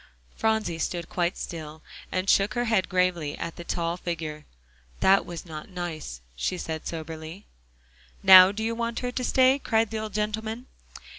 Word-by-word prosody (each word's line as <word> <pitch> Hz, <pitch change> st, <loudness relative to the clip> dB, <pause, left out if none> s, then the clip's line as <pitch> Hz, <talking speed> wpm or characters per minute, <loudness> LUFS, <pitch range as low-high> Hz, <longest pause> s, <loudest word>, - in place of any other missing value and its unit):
Phronsie 220 Hz, -7 st, 0 dB
stood 170 Hz, 0 st, -3 dB
quite 175 Hz, 0 st, -1 dB
still, 155 Hz, -2 st, -7 dB, 0.3 s
and 185 Hz, +1 st, -1 dB
shook 195 Hz, +3 st, +3 dB
her 240 Hz, 0 st, 0 dB
head 220 Hz, -5 st, +1 dB
gravely 180 Hz, -5 st, 0 dB
at 170 Hz, -, -5 dB
the 170 Hz, -, -8 dB
tall 170 Hz, 0 st, -2 dB
figure. 155 Hz, -4 st, -5 dB, 0.5 s
"That 195 Hz, +1 st, +4 dB
was 175 Hz, 0 st, -7 dB
not 155 Hz, 0 st, -8 dB
nice," 165 Hz, -, -6 dB
she 180 Hz, -, -2 dB
said 160 Hz, -2 st, -5 dB
soberly. 160 Hz, +3 st, -7 dB, 0.8 s
"Now 185 Hz, 0 st, +10 dB
do 215 Hz, +2 st, -4 dB
you 225 Hz, +1 st, 0 dB
want 235 Hz, 0 st, -3 dB
her 250 Hz, -1 st, -2 dB
to 250 Hz, -, -3 dB
stay?" 260 Hz, +2 st, +4 dB
cried 225 Hz, -4 st, +1 dB
the 220 Hz, -, -2 dB
old 215 Hz, -1 st, -6 dB
gentleman. 220 Hz, +3 st, -2 dB
185 Hz, 165 wpm, -26 LUFS, 165-220 Hz, 0.8 s, Now